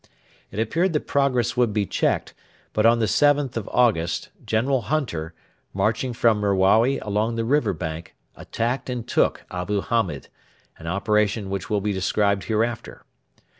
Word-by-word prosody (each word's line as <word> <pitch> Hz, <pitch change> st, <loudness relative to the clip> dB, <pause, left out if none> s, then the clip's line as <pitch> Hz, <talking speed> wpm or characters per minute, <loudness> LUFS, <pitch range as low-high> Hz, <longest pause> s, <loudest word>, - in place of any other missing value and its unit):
It 100 Hz, -, -10 dB
appeared 165 Hz, +10 st, +1 dB
that 150 Hz, -, -1 dB
progress 125 Hz, -4 st, +1 dB
would 120 Hz, -4 st, +2 dB
be 105 Hz, -1 st, +1 dB
checked, -, -, -1 dB, 0.4 s
but 110 Hz, +1 st, +3 dB
on 115 Hz, +1 st, +5 dB
the 115 Hz, -, +1 dB
7th 145 Hz, +3 st, +2 dB
of 115 Hz, -3 st, -4 dB
August 95 Hz, -9 st, +1 dB
General 125 Hz, +4 st, +1 dB
Hunter, 85 Hz, -, -2 dB, 0.4 s
marching 110 Hz, +6 st, 0 dB
from 115 Hz, -2 st, +2 dB
Merawi 100 Hz, +6 st, +3 dB
along 105 Hz, +3 st, -1 dB
the 115 Hz, 0 st, -1 dB
river 125 Hz, -4 st, +2 dB
bank, 80 Hz, -2 st, -6 dB, 0.2 s
attacked 120 Hz, +4 st, -3 dB
and 125 Hz, -2 st, -4 dB
took -, -, +1 dB
Abu 90 Hz, +3 st, -2 dB
Hamed 95 Hz, -, -1 dB, 0.5 s
an 80 Hz, -, -9 dB
operation 105 Hz, +2 st, 0 dB
which 100 Hz, -1 st, -4 dB
will 105 Hz, -1 st, 0 dB
be 105 Hz, +1 st, -1 dB
described 100 Hz, +1 st, 0 dB
hereafter. 115 Hz, +1 st, -2 dB
110 Hz, 150 wpm, -23 LUFS, 100-120 Hz, 0.5 s, on